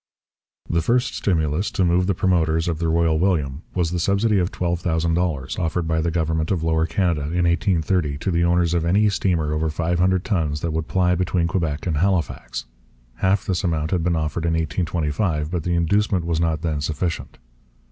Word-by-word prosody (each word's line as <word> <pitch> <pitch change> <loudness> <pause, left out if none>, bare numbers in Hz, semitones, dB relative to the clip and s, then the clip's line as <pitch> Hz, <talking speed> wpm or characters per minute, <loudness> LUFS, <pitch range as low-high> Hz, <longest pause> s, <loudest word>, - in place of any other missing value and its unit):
The 85 0 +1
first 120 +9 +1
stimulus 80 0 0
to 95 - 0
move 90 +1 +2
the 100 - +1
promoters 80 -2 +1
of 80 -2 -1
the 85 -1 0
Royal 80 -1 +2
William 80 -6 0
was 85 -3 0
the 90 - -1
subsidy 100 +3 +2
of 90 0 0
$12,000 85 -4 -1
offered 85 0 -1
by 80 0 +1
the 85 - 0
government 80 -1 -1
of 85 -4 0
Lower 80 0 +1
Canada 85 -4 0
in 85 +5 -1
1830 85 -3 +1
to 95 - -2
the 85 0 +1
owners 85 -1 +2
of 85 -2 +1
any 100 +5 +3
steamer 85 -6 0
over 80 +1 0
five 85 +2 -1
hundred 95 0 +2
tons 80 -7 -1
that 85 -2 -2
would 80 0 -2
ply 90 -1 +2
between 90 -1 0
Quebec 80 -4 -2
and 80 -4 0
Halifax. 85 -8 -1 0.5
Half 95 +1 +1
this 95 +1 -1
amount 80 -3 -1
had 90 - +1
been 85 0 +1
offered 80 +1 -2
in 85 - +1
1825, 80 0 -1
but 90 -2 -1
the 85 +2 -1
inducement 90 +2 +1
was 85 -1 0
not 80 -1 0
then 75 -3 -1
sufficient. 80 +3 -3
85 Hz, 190 wpm, -22 LUFS, 80-90 Hz, 0.5 s, any